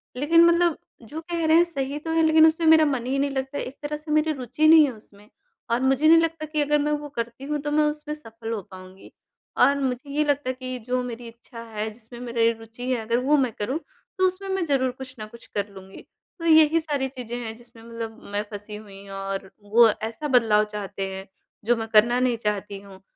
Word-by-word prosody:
लेकिन 320 Hz, +6 st, +4 dB
मतलब 340 Hz, -1 st, +3 dB, 0.2 s
जो 295 Hz, +8 st, -8 dB
कह 335 Hz, 0 st, -3 dB
रहे 315 Hz, +1 st, +5 dB
हैं 340 Hz, -, +6 dB
सही 280 Hz, -4 st, -4 dB
तो 320 Hz, +2 st, -5 dB
है 325 Hz, 0 st, +3 dB
लेकिन 315 Hz, 0 st, +6 dB
उसमें 320 Hz, +1 st, 0 dB
मेरा 315 Hz, -1 st, +7 dB
मन 270 Hz, -5 st, -1 dB
ही 265 Hz, +2 st, -1 dB
नहीं 280 Hz, +1 st, +1 dB
लगता 270 Hz, +1 st, -3 dB
है -, -, -2 dB
एक 260 Hz, -, -8 dB
तरह 295 Hz, 0 st, -3 dB
से 300 Hz, +1 st, -9 dB
मेरी 310 Hz, +1 st, +2 dB
रुचि 270 Hz, +3 st, 0 dB
नहीं 320 Hz, 0 st, +8 dB
है 275 Hz, -, -2 dB
उसमें 210 Hz, -1 st, -18 dB, 0.4 s
और 235 Hz, +2 st, +1 dB
मुझे 270 Hz, +3 st, +3 dB
नहीं 330 Hz, +1 st, +8 dB
लगता 330 Hz, -1 st, -2 dB
कि 305 Hz, 0 st, -2 dB
अगर 295 Hz, +1 st, +2 dB
मैं 295 Hz, +1 st, 0 dB
वो 295 Hz, 0 st, -3 dB
करती 235 Hz, +2 st, -5 dB
हूँ 295 Hz, +1 st, -2 dB
तो 295 Hz, 0 st, -3 dB
मैं 305 Hz, +1 st, +3 dB
उसमें 300 Hz, 0 st, -3 dB
सफल 225 Hz, -5 st, -9 dB
हो 220 Hz, -3 st, -2 dB
पाऊँगी। 185 Hz, 0 st, -13 dB, 0.5 s
और 280 Hz, 0 st, +4 dB
मुझे 260 Hz, 0 st, -3 dB
ये 300 Hz, -, +3 dB
लगता 285 Hz, -2 st, 0 dB
है -, -, 0 dB
कि 255 Hz, 0 st, -5 dB
जो 250 Hz, 0 st, 0 dB
मेरी 240 Hz, -1 st, -7 dB
इच्छा 230 Hz, +1 st, -12 dB
है 215 Hz, +1 st, -2 dB
जिसमें 230 Hz, +2 st, -13 dB
मेरे 235 Hz, -1 st, +1 dB
रुचि 230 Hz, +3 st, -6 dB
है 245 Hz, -3 st, 0 dB
अगर 230 Hz, +2 st, 0 dB
वो 295 Hz, +2 st, +4 dB
मैं 260 Hz, -4 st, +1 dB
करूँ 255 Hz, +9 st, -2 dB, 0.4 s
तो 375 Hz, 0 st, +4 dB
उसमें 380 Hz, +2 st, -5 dB
मैं 380 Hz, -2 st, 0 dB
ज़रूर 265 Hz, -4 st, +1 dB
कुछ 255 Hz, +1 st, -10 dB
न 215 Hz, -, -5 dB
कुछ 235 Hz, +2 st, -15 dB
कर 205 Hz, 0 st, -1 dB
लूँगी 190 Hz, 0 st, -12 dB, 0.4 s
तो 335 Hz, -, -6 dB
यही 320 Hz, 0 st, +6 dB
सारी 290 Hz, -4 st, -2 dB
चीज़ें 250 Hz, -3 st, -7 dB
हैं 220 Hz, 0 st, -6 dB
जिसमें 235 Hz, -1 st, -17 dB
मतलब 230 Hz, -1 st, -7 dB
मैं 205 Hz, +1 st, 0 dB
फँसी 205 Hz, +1 st, -8 dB
हुई 200 Hz, -2 st, -12 dB
और 195 Hz, 0 st, -5 dB
वो 225 Hz, +3 st, +5 dB, 0.2 s
ऐसा 230 Hz, +7 st, -5 dB
बदलाव 225 Hz, -6 st, +4 dB
चाहते 200 Hz, -1 st, -4 dB
हैं 190 Hz, +1 st, -8 dB, 0.4 s
जो 240 Hz, +2 st, +3 dB
मैं 225 Hz, 0 st, -4 dB
करना 235 Hz, +3 st, +5 dB
नहीं 250 Hz, -2 st, +1 dB
चाहती 205 Hz, -2 st, -3 dB
हूँ 195 Hz, -1 st, -14 dB
255 Hz, 235 wpm, -24 LUFS, 225-300 Hz, 0.5 s, नहीं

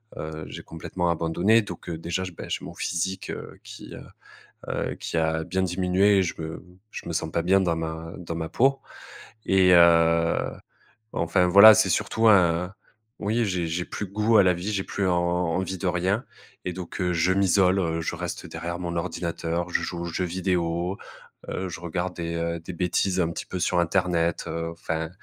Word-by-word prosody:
heu, 80 Hz, 0 st, -6 dB
j'ai -, -, -8 dB
complètement 85 Hz, +2 st, -3 dB
abandonné. 85 Hz, +7 st, +2 dB
Donc 100 Hz, -, -8 dB
heu, 80 Hz, -, -3 dB
déjà, 85 Hz, +3 st, -3 dB
je 90 Hz, -, -5 dB
beh, -, -, -9 dB
j'ai -, -, -3 dB
mon -, -, -8 dB
physique, 95 Hz, +2 st, -3 dB
heu, -, -, -8 dB
qui, -, -, -10 dB
heu -, -, -9 dB, 0.7 s
heu, -, -, -2 dB
qui 85 Hz, -, -3 dB
a 80 Hz, 0 st, 0 dB
bien 95 Hz, +2 st, -2 dB
diminué 95 Hz, +2 st, +2 dB
et -, -, +4 dB
je 85 Hz, -, -4 dB
me 80 Hz, +1 st, -6 dB, 0.3 s
je -, -, -8 dB
me 85 Hz, -, -3 dB
sens 80 Hz, 0 st, -2 dB
pas 85 Hz, -, 0 dB
bien 95 Hz, +3 st, +4 dB
dans 85 Hz, -3 st, +1 dB
ma 80 Hz, 0 st, -5 dB
dans 85 Hz, -2 st, -6 dB
ma 80 Hz, -1 st, -3 dB
peau. 135 Hz, +2 st, +2 dB, 0.7 s
Et 95 Hz, -1 st, +4 dB
heu, 85 Hz, -1 st, +5 dB, 0.8 s
enfin, 90 Hz, +2 st, +2 dB
voilà, 100 Hz, +4 st, +10 dB
c'est 110 Hz, -3 st, +3 dB
surtout 110 Hz, +5 st, +2 dB
un 90 Hz, -1 st, +4 dB, 0.5 s
oui, 110 Hz, +3 st, +1 dB
j'ai 90 Hz, -3 st, -1 dB
j'ai 85 Hz, +2 st, -2 dB
plus 105 Hz, -, -5 dB
goût 105 Hz, +3 st, +2 dB
à -, -, +8 dB
la 90 Hz, -1 st, +4 dB
vie, 90 Hz, +5 st, -4 dB
j'ai 95 Hz, -2 st, -1 dB
plus 100 Hz, -2 st, -1 dB
en 90 Hz, -, +2 dB
en 85 Hz, -1 st, 0 dB
envie 95 Hz, 0 st, -2 dB
de 95 Hz, -, -3 dB
rien 95 Hz, +7 st, 0 dB, 0.4 s
et 90 Hz, -, -2 dB
donc 90 Hz, +1 st, -7 dB
heu, 90 Hz, -1 st, +1 dB
je 85 Hz, +2 st, +2 dB
m'isole, 95 Hz, -3 st, +2 dB
je -, -, -3 dB
reste -, -, -5 dB
derrière 85 Hz, +1 st, -5 dB
mon 85 Hz, -1 st, -3 dB
ordinateur, 85 Hz, 0 st, -3 dB
je -, -, 0 dB
joue 85 Hz, -1 st, -4 dB
aux -, -, -3 dB
jeux 85 Hz, +2 st, -2 dB
vidéo, 90 Hz, 0 st, -1 dB, 0.5 s
heu, 95 Hz, 0 st, -3 dB
je 85 Hz, -, -7 dB
regarde 90 Hz, +1 st, -3 dB
des, 85 Hz, -1 st, -4 dB
heu, 85 Hz, 0 st, -2 dB
des 90 Hz, +2 st, -8 dB
bêtises 90 Hz, +2 st, 0 dB
un 85 Hz, -1 st, +1 dB
petit -, -, -6 dB
peu 90 Hz, -, -5 dB
sur 90 Hz, 0 st, +2 dB
Internet, 85 Hz, -1 st, +1 dB
heu, 85 Hz, 0 st, -3 dB
enfin, 80 Hz, -1 st, -4 dB
90 Hz, 200 wpm, -25 LUFS, 85-95 Hz, 0.8 s, voilà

